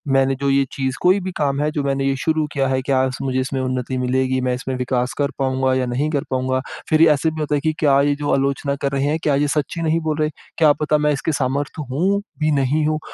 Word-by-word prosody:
मैंने 135 Hz, 0 st, +3 dB
जो 140 Hz, 0 st, 0 dB
ये 135 Hz, 0 st, +3 dB
चीज़ 130 Hz, -1 st, -2 dB
कोई 185 Hz, +3 st, +4 dB
भी 185 Hz, 0 st, -4 dB
काम 140 Hz, -2 st, 0 dB
है 150 Hz, -, +1 dB
जो 150 Hz, -2 st, -2 dB
मैंने 135 Hz, 0 st, 0 dB
ये 135 Hz, -, +1 dB
शुरू 160 Hz, -1 st, +1 dB
किया 135 Hz, -2 st, +1 dB
है 130 Hz, 0 st, 0 dB
क्या 130 Hz, -1 st, +1 dB
उस 130 Hz, -, -5 dB
मुझे 130 Hz, -1 st, -1 dB
इसमें 130 Hz, +1 st, -2 dB
उन्नति 130 Hz, 0 st, -2 dB
मिलेगी, 130 Hz, +1 st, 0 dB
मैं 125 Hz, 0 st, 0 dB
इसमें 130 Hz, +1 st, -4 dB
विकास 125 Hz, 0 st, -1 dB
कर 145 Hz, 0 st, 0 dB
पाऊँगा 130 Hz, -1 st, +1 dB
या 130 Hz, -1 st, +1 dB
नहीं 130 Hz, +5 st, -1 dB
कर 140 Hz, -3 st, 0 dB
पाऊँगा? 130 Hz, 0 st, 0 dB, 0.3 s
फिर 155 Hz, 0 st, +3 dB
ये 165 Hz, -, +7 dB
ऐसे 150 Hz, +2 st, +2 dB
भी 160 Hz, -, -7 dB
होता 150 Hz, -1 st, 0 dB
है 140 Hz, -, 0 dB
कि 155 Hz, 0 st, 0 dB
क्या 140 Hz, -3 st, +4 dB
ये 145 Hz, 0 st, +2 dB
जो 145 Hz, 0 st, -2 dB
आलोचना 140 Hz, +1 st, 0 dB
कर 140 Hz, -, 0 dB
रहे 135 Hz, 0 st, 0 dB
हैं 150 Hz, +2 st, +1 dB
क्या 145 Hz, -2 st, +2 dB
ये 145 Hz, +1 st, +1 dB
सच्ची 150 Hz, +3 st, -2 dB
नहीं 165 Hz, +1 st, +1 dB
बोल 155 Hz, -1 st, -1 dB
रहे, 155 Hz, 0 st, +2 dB, 0.3 s
क्या 155 Hz, -3 st, +5 dB
पता 150 Hz, 0 st, +2 dB
मैं 150 Hz, 0 st, +2 dB
इसके 145 Hz, +3 st, -2 dB
सामर्थ्य 140 Hz, +2 st, -2 dB
हूँ 190 Hz, +9 st, +1 dB, 0.2 s
भी 155 Hz, 0 st, +1 dB
नहीं 145 Hz, +2 st, +1 dB
हूँ? 155 Hz, 0 st, 0 dB
140 Hz, 265 wpm, -20 LUFS, 130-150 Hz, 0.3 s, ये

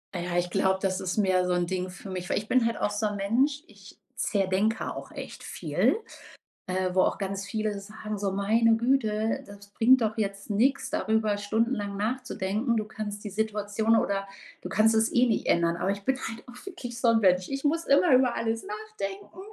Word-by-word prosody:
Ja, 175 Hz, 0 st, -2 dB
ich 175 Hz, 0 st, +1 dB
glaube, 190 Hz, +1 st, +1 dB
das 190 Hz, -1 st, 0 dB
ist 185 Hz, +3 st, -3 dB
mehr 185 Hz, -3 st, +3 dB
so 180 Hz, -, +1 dB
'n 175 Hz, -1 st, +1 dB
Ding 185 Hz, 0 st, -2 dB
für 195 Hz, +1 st, -10 dB
mich, 180 Hz, -1 st, -5 dB
weil -, -, +1 dB
ich 210 Hz, -, -9 dB
bin 255 Hz, -2 st, +3 dB
halt 230 Hz, -1 st, 0 dB
auch -, -, +1 dB
so 205 Hz, +1 st, -2 dB
'n 205 Hz, -1 st, -1 dB
Mensch, 260 Hz, +9 st, +1 dB
ich -, -, -16 dB, 0.2 s
zerdenke 200 Hz, +3 st, 0 dB
auch -, -, -8 dB
echt -, -, -8 dB
viel, -, -, 0 dB, 0.7 s
äh, 185 Hz, 0 st, -1 dB
wo 185 Hz, -, +4 dB
auch -, -, 0 dB
ganz 195 Hz, 0 st, -3 dB
viele 215 Hz, -2 st, -2 dB
sagen, 215 Hz, +1 st, -6 dB
so: 195 Hz, -1 st, -1 dB
„Meine 225 Hz, +3 st, +3 dB
Güte, 225 Hz, -3 st, +1 dB
das 200 Hz, 0 st, -12 dB
bringt 255 Hz, +4 st, +5 dB
doch 220 Hz, 0 st, 0 dB
jetzt 200 Hz, -1 st, -3 dB
nix 245 Hz, +7 st, +2 dB
darüber 215 Hz, 0 st, +1 dB
stundenlang 205 Hz, 0 st, -1 dB
nachzudenken. 230 Hz, 0 st, -1 dB
Du 215 Hz, -, +1 dB
kannst 210 Hz, -1 st, -6 dB
die 210 Hz, -, -5 dB
Situation 215 Hz, +1 st, 0 dB
oder 195 Hz, -2 st, 0 dB, 0.3 s
du -, -, -6 dB
kannst 215 Hz, +4 st, +3 dB
es 220 Hz, +1 st, +2 dB
eh 245 Hz, -, +5 dB
nicht 230 Hz, -3 st, 0 dB
ändern.“ 170 Hz, 0 st, +2 dB
Aber 195 Hz, -, 0 dB
ich 200 Hz, 0 st, -5 dB
bin 265 Hz, +3 st, +1 dB
halt 225 Hz, -3 st, -6 dB
auch 245 Hz, +8 st, -12 dB
wirklich 250 Hz, -11 st, -7 dB
so 245 Hz, -, +2 dB
'n 230 Hz, -, +4 dB
Mensch. 180 Hz, -1 st, +3 dB
Ich 275 Hz, 0 st, -4 dB
muss 325 Hz, +3 st, +1 dB
immer 280 Hz, +2 st, +5 dB
über 255 Hz, -1 st, +4 dB
alles 225 Hz, 0 st, -2 dB
nachdenken 205 Hz, -, -7 dB
210 Hz, 205 wpm, -27 LUFS, 195-230 Hz, 0.7 s, bringt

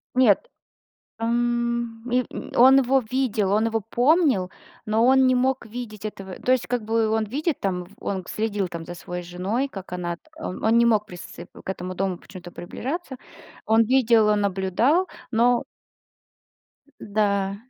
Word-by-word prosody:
Нет, 255 Hz, -, +4 dB, 0.7 s
м, 235 Hz, 0 st, -1 dB
и 250 Hz, +1 st, +2 dB, 0.3 s
он 260 Hz, +3 st, +8 dB
его 265 Hz, 0 st, +3 dB
видел, 225 Hz, -7 st, 0 dB
он 215 Hz, +2 st, +3 dB
его 225 Hz, 0 st, 0 dB
помнил, 245 Hz, -, +2 dB, 0.4 s
но 220 Hz, +2 st, +2 dB
он 265 Hz, 0 st, +5 dB
не 255 Hz, -, +4 dB
мог 255 Hz, 0 st, 0 dB
видеть 220 Hz, -2 st, -8 dB
этого. 195 Hz, -3 st, -6 dB
То 255 Hz, -, +1 dB
есть, 255 Hz, -2 st, +1 dB
как 245 Hz, -1 st, -1 dB
бы, 225 Hz, +1 st, +1 dB
он 220 Hz, 0 st, +1 dB
видит 290 Hz, -, -2 dB
там, 180 Hz, -2 st, -2 dB
он 190 Hz, -2 st, -3 dB
следил 210 Hz, -3 st, -2 dB
там 170 Hz, -1 st, -7 dB
за 175 Hz, -, -7 dB
своей 180 Hz, 0 st, -6 dB
женой, 185 Hz, +10 st, -2 dB
как 195 Hz, -7 st, -9 dB
она. 175 Hz, -1 st, -3 dB, 0.2 s
Он 225 Hz, -4 st, 0 dB
не 235 Hz, -, +5 dB
мог 215 Hz, -2 st, +2 dB
присц 175 Hz, -4 st, -10 dB, 0.3 s
к -, -, -11 dB
этому 185 Hz, -1 st, -5 dB
дому 190 Hz, 0 st, -1 dB
почему-то 180 Hz, -2 st, -11 dB
приближаться. 265 Hz, -, -5 dB, 0.5 s
Он 225 Hz, +1 st, +4 dB
видел, 230 Hz, -3 st, +4 dB
он 210 Hz, -1 st, +3 dB
наблюдал, 200 Hz, -, +1 dB, 0.2 s
но. 240 Hz, +1 st, +3 dB, 1.2 s
Э. 285 Hz, -, -28 dB
Да. 200 Hz, -2 st, 0 dB
225 Hz, 155 wpm, -24 LUFS, 195-250 Hz, 1.2 s, он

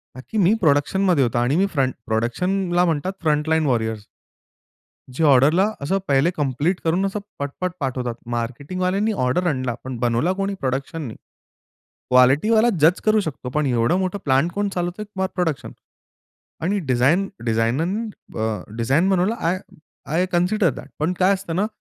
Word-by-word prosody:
का 130 Hz, -, -9 dB
की 220 Hz, -, -3 dB
मी 195 Hz, +1 st, +4 dB
प्रोडक्शनमध्ये 155 Hz, +2 st, +3 dB
होतो. 120 Hz, 0 st, -1 dB
आणि 120 Hz, +4 st, +1 dB
मी 190 Hz, +4 st, +3 dB
फ्रंट 130 Hz, -2 st, +1 dB
प्रोडक्शनला 175 Hz, -, 0 dB
म्हणतात 165 Hz, +3 st, -1 dB
फ्रंट 150 Hz, -1 st, +1 dB
लाईन 160 Hz, -1 st, +2 dB
वॉरियर्स. 110 Hz, -5 st, -1 dB, 1.1 s
जे 160 Hz, -, 0 dB
ऑर्डरला 150 Hz, +7 st, +5 dB
असं 190 Hz, +8 st, 0 dB
पहिले 140 Hz, +5 st, +3 dB
कम्प्लीट 145 Hz, +5 st, 0 dB
करून, 175 Hz, +4 st, +1 dB
असं 195 Hz, +2 st, -2 dB, 0.2 s
पट-पट 145 Hz, +6 st, -3 dB
पाठवतात. 125 Hz, -4 st, -2 dB, 0.2 s
मार्केटिंगवाल्यांनी 185 Hz, -, -1 dB
ऑर्डर 175 Hz, +8 st, +1 dB
आणला, 130 Hz, -5 st, -1 dB
पण 130 Hz, -2 st, -5 dB
बनवला 120 Hz, +8 st, +1 dB
कोणी? 195 Hz, +1 st, -2 dB
प्रोडक्शननी. 135 Hz, 0 st, -3 dB, 1.0 s
क्वालिटीवाला 150 Hz, -, +5 dB
जज 160 Hz, +4 st, +4 dB
करू 215 Hz, 0 st, +4 dB
शकतो, 145 Hz, -7 st, -5 dB
पण 150 Hz, +2 st, 0 dB
एवढं 125 Hz, +6 st, +2 dB
मोठं 190 Hz, +1 st, -2 dB
प्लांट 140 Hz, +5 st, +2 dB
कोण 205 Hz, +2 st, -1 dB
चालवतोय 190 Hz, +2 st, -3 dB
प्रोडक्शन. 165 Hz, -6 st, -2 dB, 0.9 s
आणि 200 Hz, +5 st, +1 dB
डिझाइन 140 Hz, +10 st, +3 dB, 0.2 s
डिझाइननं 140 Hz, -, 0 dB, 0.2 s
ब -, -, -7 dB, 0.4 s
डिझाइन 135 Hz, +11 st, +2 dB
बनवलं 190 Hz, +4 st, +2 dB
आय 175 Hz, +1 st, 0 dB, 0.6 s
आय 180 Hz, +3 st, +2 dB
कन्सिडर 180 Hz, +1 st, +2 dB
दॅट. -, -, -10 dB
पण 160 Hz, +4 st, 0 dB
काय 190 Hz, +2 st, +4 dB
असतं 180 Hz, -3 st, -5 dB
ना, 205 Hz, -, +2 dB
160 Hz, 150 wpm, -22 LUFS, 130-185 Hz, 1.1 s, ऑर्डरला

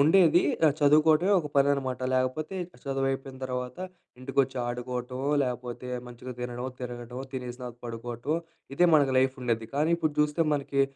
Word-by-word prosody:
ఉండేది 170 Hz, +1 st, +6 dB, 0.2 s
ఆహ్, 145 Hz, -, +4 dB
చదువుకోవటమే 155 Hz, +6 st, +5 dB
ఒక 150 Hz, -, -5 dB
పని 140 Hz, 0 st, +5 dB
అన్నమాట. 130 Hz, -2 st, -2 dB
లేకపోతే 130 Hz, +8 st, -1 dB, 0.3 s
చదువు 135 Hz, 0 st, -1 dB
అయిపోయిన 135 Hz, 0 st, -5 dB
తర్వాత 125 Hz, +4 st, -4 dB, 0.4 s
ఇంటికొచ్చి, 135 Hz, 0 st, 0 dB
ఆడుకోవటమో 125 Hz, +2 st, -3 dB
లేకపోతే 125 Hz, -1 st, -4 dB, 0.2 s
మంచిగా 125 Hz, +1 st, -8 dB
తినడమో, 125 Hz, +1 st, -4 dB
తిరగడమో, 120 Hz, +1 st, -6 dB
తినేసినాకా 125 Hz, -1 st, -6 dB
పడుకోవటమో, 120 Hz, +6 st, -3 dB, 0.4 s
ఇదే 175 Hz, -, +5 dB
మనకు 140 Hz, -3 st, +4 dB
లైఫ్ 130 Hz, 0 st, +3 dB
ఉండేది. 115 Hz, -2 st, -1 dB
కానీ 155 Hz, +3 st, +2 dB
ఇప్పుడు 155 Hz, -2 st, 0 dB
చూస్తే 150 Hz, +2 st, +2 dB
మనకి 140 Hz, -1 st, +1 dB
130 Hz, 140 wpm, -28 LUFS, 125-145 Hz, 0.4 s, ఉండేది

